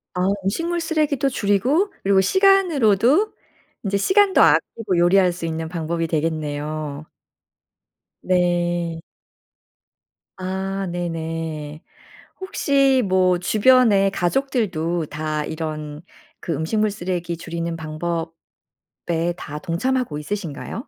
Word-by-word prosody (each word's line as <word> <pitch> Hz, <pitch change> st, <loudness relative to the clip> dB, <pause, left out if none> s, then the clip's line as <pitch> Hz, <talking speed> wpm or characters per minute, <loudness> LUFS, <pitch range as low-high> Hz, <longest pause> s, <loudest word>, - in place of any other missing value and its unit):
아 180 Hz, +1 st, +1 dB, 0.2 s
음식물 335 Hz, -, -1 dB
쓰레기도 300 Hz, -4 st, 0 dB
줄이고 250 Hz, -, +1 dB
그리고 195 Hz, 0 st, +4 dB
시간으로도 335 Hz, -, +3 dB, 0.5 s
이제 200 Hz, 0 st, +1 dB
시간도 385 Hz, -, +4 dB
아끼고 205 Hz, -6 st, +2 dB
요리할 180 Hz, +1 st, +4 dB
수 170 Hz, -1 st, -6 dB
있는 160 Hz, 0 st, -3 dB
방법이 165 Hz, -1 st, -2 dB
되겠네요. 155 Hz, -1 st, -3 dB, 1.2 s
네. 175 Hz, -2 st, 0 dB, 1.3 s
아 190 Hz, +1 st, -3 dB
네네. 165 Hz, -3 st, -4 dB, 0.6 s
혹시 275 Hz, -8 st, +2 dB
뭐 185 Hz, -1 st, +2 dB
주변에 210 Hz, -1 st, +4 dB
가족들도 175 Hz, -, -1 dB
다 155 Hz, 0 st, -3 dB
이런 155 Hz, -2 st, -5 dB, 0.4 s
그 170 Hz, -, -3 dB
음식물 210 Hz, +8 st, 0 dB
쓰레기 175 Hz, -3 st, -3 dB
줄이는 170 Hz, 0 st, -4 dB
방법에 165 Hz, +1 st, -4 dB, 1.0 s
다 150 Hz, +1 st, -7 dB
동참하고 190 Hz, -, -1 dB
있으신가요? 200 Hz, -, -5 dB
180 Hz, 230 characters per minute, -22 LUFS, 165-225 Hz, 1.3 s, 그리고